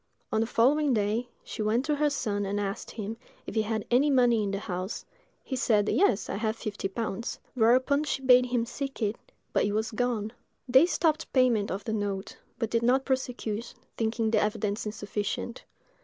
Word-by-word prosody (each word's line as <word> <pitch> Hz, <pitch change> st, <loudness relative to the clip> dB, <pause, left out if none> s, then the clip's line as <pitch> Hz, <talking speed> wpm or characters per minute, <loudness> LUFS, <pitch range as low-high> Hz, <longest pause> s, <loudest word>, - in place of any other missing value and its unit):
On 220 Hz, -, +2 dB
the 225 Hz, -, 0 dB
following 275 Hz, +4 st, +3 dB
day, 215 Hz, +3 st, 0 dB, 0.2 s
she -, -, -6 dB
went 225 Hz, +5 st, +1 dB
to 300 Hz, -, +1 dB
her 300 Hz, 0 st, +3 dB
son 205 Hz, -7 st, -1 dB
and 200 Hz, +1 st, -1 dB
asked 200 Hz, +2 st, -3 dB
him 220 Hz, 0 st, -5 dB, 0.3 s
if -, -, -6 dB
he 220 Hz, -, +2 dB
had 215 Hz, 0 st, -2 dB
any 265 Hz, +5 st, +4 dB
money 245 Hz, -4 st, +4 dB
in 205 Hz, -, -1 dB
the 195 Hz, -, -2 dB
house; 185 Hz, -1 st, -4 dB, 0.4 s
he 265 Hz, -, -4 dB
said, 210 Hz, -4 st, +2 dB
"Yes, 245 Hz, -, +2 dB
I -, -, -3 dB
have 220 Hz, 0 st, -1 dB
fifty 215 Hz, -3 st, -4 dB
pounds:" 225 Hz, +2 st, -4 dB, 0.2 s
whereupon 260 Hz, +5 st, +3 dB
she 270 Hz, -, -2 dB
bade 250 Hz, -1 st, +6 dB
him 240 Hz, -2 st, 0 dB
seek 270 Hz, 0 st, -5 dB
it, 210 Hz, +1 st, 0 dB, 0.4 s
but -, -, +3 dB
it 205 Hz, -, 0 dB
was 220 Hz, +1 st, -1 dB
gone. 225 Hz, -2 st, -1 dB, 0.3 s
They 260 Hz, +6 st, +6 dB
stopped 320 Hz, -3 st, 0 dB
payment 245 Hz, -6 st, +3 dB
of 195 Hz, +2 st, -3 dB
the 220 Hz, -, -3 dB
note; 200 Hz, -2 st, -3 dB, 0.2 s
but 230 Hz, -3 st, -2 dB
did 230 Hz, -, +2 dB
not 255 Hz, +3 st, +3 dB
prosecute, 245 Hz, -4 st, -2 dB, 0.2 s
thinking 225 Hz, 0 st, 0 dB
the -, -, +3 dB
evidence 210 Hz, 0 st, -1 dB
insufficient. 210 Hz, +3 st, -4 dB
225 Hz, 190 wpm, -28 LUFS, 210-250 Hz, 0.4 s, bade